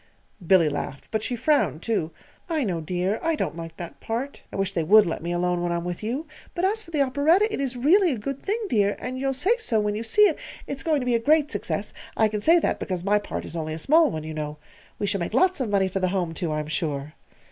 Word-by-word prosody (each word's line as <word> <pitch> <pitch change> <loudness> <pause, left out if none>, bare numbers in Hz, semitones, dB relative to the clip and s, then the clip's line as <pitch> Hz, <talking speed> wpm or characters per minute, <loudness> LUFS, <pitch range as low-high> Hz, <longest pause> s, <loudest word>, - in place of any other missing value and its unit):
Billy 180 -3 +5
laughed, 140 -2 -4
but 220 - 0
she 245 - -1
frowned, 240 - +1
too. 210 -8 0 0.4
"I 315 -4 0
know, 180 -7 -2
dear; 180 +5 -1
I 325 0 +1
don't 180 - -2
like 165 -1 -8
that 170 -1 -8
part. 245 +5 -4
I - - -8
wish 195 0 -1
they 170 - 0
would 210 +6 +6
let 165 - -3
me 170 +1 -3
alone 175 0 0
when 175 0 -1
I'm 170 0 -1
with 175 0 -4
you! 245 +9 -3 0.3
But 355 +1 0
as 430 +3 +1
for 360 - -15
the 300 -4 +2
operetta, 320 +11 +2
it - - -2
is 260 -2 -2
really 345 +8 +4
a 255 - -2
good 275 +6 -5
thing, 410 +3 -1
dear, 205 - +2
and 255 +1 -5
you'll 270 0 -1
say 390 - +3
so 235 - +1
when 210 0 0
you 210 - -3
see 230 - +4
it. 380 -7 +3 0.3
It's 280 -1 -4
going 310 -4 +1
to - - -3
be 250 - +1
a 230 - +3
great 295 +4 +3
success 205 0 -2 0.2
I 220 -1 +4
can 210 -1 -3
say 330 +9 +6
that 335 - 0
because 180 -2 -3
my 205 +2 +3
part 205 - -5
is - - -6
only 155 -1 -3
a - - -5
small 315 - +4
one, 155 -1 -4
you 155 0 -6
know. 150 -1 -4 0.4
We 205 - -2
shall 200 0 0
make 175 +5 -3
lots 370 +3 +3
of 240 - -1
money 195 -2 +2
for 190 +1 -2
the 185 - +1
Home, 180 -3 -1
too, 165 -1 -3
I'm 150 0 -2
sure." 150 -2 -3
210 Hz, 265 wpm, -25 LUFS, 175-285 Hz, 0.4 s, would